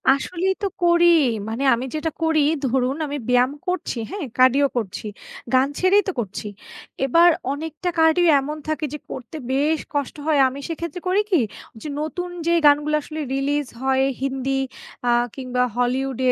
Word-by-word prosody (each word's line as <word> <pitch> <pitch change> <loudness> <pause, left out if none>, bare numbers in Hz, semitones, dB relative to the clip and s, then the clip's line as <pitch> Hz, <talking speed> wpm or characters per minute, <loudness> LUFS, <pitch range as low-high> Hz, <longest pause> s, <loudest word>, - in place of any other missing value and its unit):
আসলেই 365 +6 -1
তো - - +2 0.2
করি। 345 0 +5 0.4
মানে 230 +5 -3
আমি 240 +2 -2
যেটা 315 +1 -2
করি 320 -1 +3 0.3
ধরুন 255 +1 +1
আমি 290 +1 -3
ব্যায়াম 250 +1 +4 0.2
করছি 360 -7 -2
হ্যাঁ? 395 -6 -4
cardio 260 +2 +5
করছি। 215 -2 -4 0.5
গান 260 +1 +5
ছেড়েই 390 +3 +4
তো - - +1
করছি। 210 -1 -4 0.6
এবার 335 +6 +6 0.2
অনেকটা 315 +4 -4
cardio 320 +2 +4 0.2
এমন 300 +3 -5
থাকে 310 0 -1
যে - - -3
করতে 255 +5 -7 0.2
বেশ 300 +3 +2
কষ্ট 285 -2 -2
হয়। 305 -3 +3
আমি 270 +2 -8
সেক্ষেত্রে 335 +2 -5
করি 380 +3 +3
কি, 345 -7 +4 0.4
যে - - -6
নতুন 355 +4 -4 0.2
যে 340 - +3
গানগুলো 295 +1 +4
আসলে 310 +1 -6
release 280 0 -1
হয় 265 0 +2 0.2
হিন্দি 270 0 -1 0.5
আ - - +5 0.2
কিংবা 255 -2 -1
Hollywood 255 +1 -1
290 Hz, 160 wpm, -22 LUFS, 260-325 Hz, 0.6 s, এবার